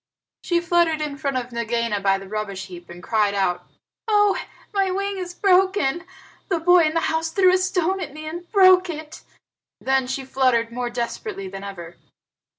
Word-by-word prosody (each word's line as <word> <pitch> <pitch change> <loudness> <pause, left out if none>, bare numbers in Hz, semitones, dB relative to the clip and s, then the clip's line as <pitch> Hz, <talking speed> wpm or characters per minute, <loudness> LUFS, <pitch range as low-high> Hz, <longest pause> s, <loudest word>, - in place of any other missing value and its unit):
She 345 -1 +1
fluttered 340 -2 +2
in 300 -2 -3
front 275 -3 -1
of 250 -1 -4
Nagaina 235 -2 -1
by 195 0 +2
the 195 0 -10
rubbish 200 -2 -4
heap 175 -2 -12
and 175 +1 -11
cried 210 -2 +1
out, 185 -3 -1 0.4
"Oh, 415 -2 +4 0.4
my 390 -2 +1
wing 395 +1 -2
is 355 -1 -6
broken! 370 -4 +2 0.4
The 345 -4 +1
boy 355 0 +5
in 310 +1 -1
the 330 - +2
house 320 0 -1
threw 370 +2 +4
a - - +5
stone 370 0 0
at 355 - -5
me 310 +2 -9
and 340 +3 -7
broke 370 -2 +6
it." 310 -1 -7 0.6
Then 265 -1 +1
she 265 +1 -4
fluttered 255 -3 +1
more 245 0 -3
desperately 235 -5 -4
than 195 +1 -8
ever. 175 -4 -9
300 Hz, 180 wpm, -22 LUFS, 225-360 Hz, 0.6 s, broke